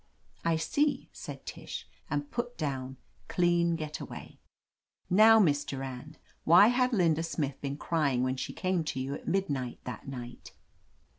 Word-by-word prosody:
"I 165 -1 +2
see," 285 - 0
said - - -8
Tish, - - -7 0.2
and 145 -1 -2
put 245 0 -3
down 135 -3 -3 0.3
"clean 175 -1 +2
get 155 -2 -5
away." - - -9 0.7
"Now, 220 +4 +8
Miss 145 -9 +4
Durand, 135 +2 -6 0.3
why 175 +7 +7
had 250 +1 +2
Linda 165 -8 +3
Smith 145 -4 -3
been 140 0 -3
crying 140 -7 +1
when 130 0 0
she - - -3
came 185 -3 0
to 135 - -3
you 135 +2 -3
at - - -8
midnight 140 -11 -1
that 125 -1 -7
night?" 125 -2 -8
155 Hz, 150 wpm, -30 LUFS, 135-180 Hz, 0.7 s, Now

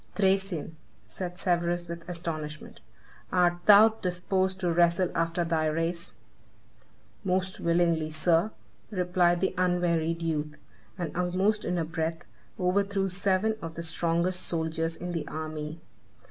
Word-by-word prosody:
"Thracian," 190 -5 0 0.3
said 180 -1 -6
Severus 175 -1 0
with 170 +1 -7
astonishment, 155 -3 -5 0.5
"art 175 -1 +3
thou 210 +1 +9
disposed 190 -2 -1
to 175 -2 +1
wrestle 170 +1 +3
after 165 +1 0
thy 165 -2 +1
race?" 165 +3 -2 1.1
"Most 185 -1 -1
willingly, 170 -2 +2
sir," 165 +5 +2 0.4
replied 180 -3 +2
the 190 - +1
unwearied 170 -2 +1
youth; 150 -2 -2 0.4
and, 170 -5 -4
almost 185 +4 +1
in 180 +1 -1
a 165 - 0
breath, 165 0 -3 0.3
overthrew 195 +1 +1
seven 195 +3 +1
of 165 0 -6
the 170 - -4
strongest 170 +2 +1
soldiers 165 0 -1
in 180 +1 -5
the 165 -3 -3
army. 155 0 -5
175 Hz, 125 wpm, -28 LUFS, 165-185 Hz, 1.1 s, thou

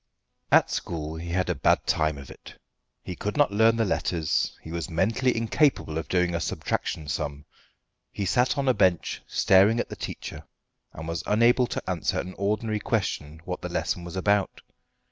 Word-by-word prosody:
At - - +5
school 80 -2 -4
he 85 +1 -6
had 90 +2 0
a - - +1
bad - - +2
time 75 -2 +1
of 70 -1 -10
it. - - -13 0.5
He 90 - -6
could 105 +7 -4
not 145 -7 +4
learn 110 +2 +4
the 115 -1 +1
letters. 85 -4 0
He 80 - -8
was 85 +1 -4
mentally 115 +9 +1
incapable 115 - +1
of 80 - -6
doing 90 -1 +1
a 85 - 0
subtraction 80 -2 -3
sum. 75 -1 -3 0.7
He 100 - -3
sat 125 +9 +2
on 140 -1 0
a 130 - +5
bench 90 -7 +1
staring 100 +5 +4
at - - -2
the - - -6
teacher, - - -7 0.5
and 80 +1 -8
was 85 -1 -2
unable 120 +3 +4
to - - -5
answer 90 -3 -1
an 95 - -5
ordinary 105 +2 0
question 80 -9 -2
what - - -4
the - - -4
lesson 90 - -2
was 85 +1 -8
about. 100 +1 +1
95 Hz, 185 wpm, -26 LUFS, 80-110 Hz, 0.7 s, At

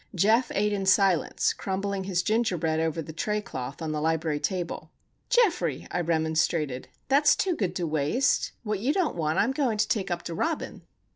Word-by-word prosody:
Geof 225 +7 +3
ate 210 +1 +1
in 195 -1 -2
silence, 190 -3 +3
crumbling 195 0 -3
his 180 -2 0
ginger 220 -2 +1
bread 160 0 0
over 160 0 -1
the 160 - -9
tray 210 +6 -1
cloth 130 -5 -6
on 155 - -2
the 150 -1 -2
library 160 -1 0
table. 180 +1 -3 0.4
"Geoffrey!" 475 -8 +2
I 175 - 0
remonstrated. 160 -4 0 0.2
"That's 285 +2 +5
too 370 -3 0
good 190 - -2
to 175 - -1
waste. 155 - +1
What 210 -3 -2
you 255 +8 +1
don't 365 -4 0
want 155 -2 -1
I - - +5
am 235 - 0
going 265 -6 0
to 210 0 +2
take 205 -4 -1
up 175 -1 -3
to 170 - -5
Robin." 320 - -3
190 Hz, 195 wpm, -27 LUFS, 160-220 Hz, 0.4 s, That's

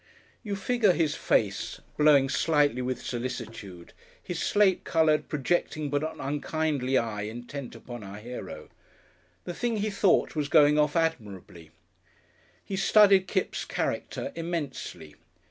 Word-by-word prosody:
You 205 -3 -4
figure 210 0 +2
his 160 -3 +1
face, - - 0 0.2
blowing 150 -3 +5
slightly 145 -3 +2
with 125 0 -3
solicitude, 115 -7 -6 0.3
his 175 -2 -4
slate 205 -3 +3
coloured, 155 -2 +2
projecting 150 0 -1
but 145 0 +1
not 155 +1 -4
unkindly 145 -1 -1
eye 110 -3 -2
intent 120 +5 -7
upon 120 -3 -9
our 100 +1 -8
hero. 120 +4 -8 0.7
The 175 - -5
thing 235 +4 -1
he 210 +1 -1
thought 195 -3 +2
was 150 -2 -1
going 150 0 +5
off 150 -1 +2
admirably. 105 - -3 1.0
He 195 - -4
studied 195 -1 +5
Kipps' 190 - -1
character 280 - -3
immensely. 145 - -5
150 Hz, 130 wpm, -27 LUFS, 125-175 Hz, 1.0 s, blowing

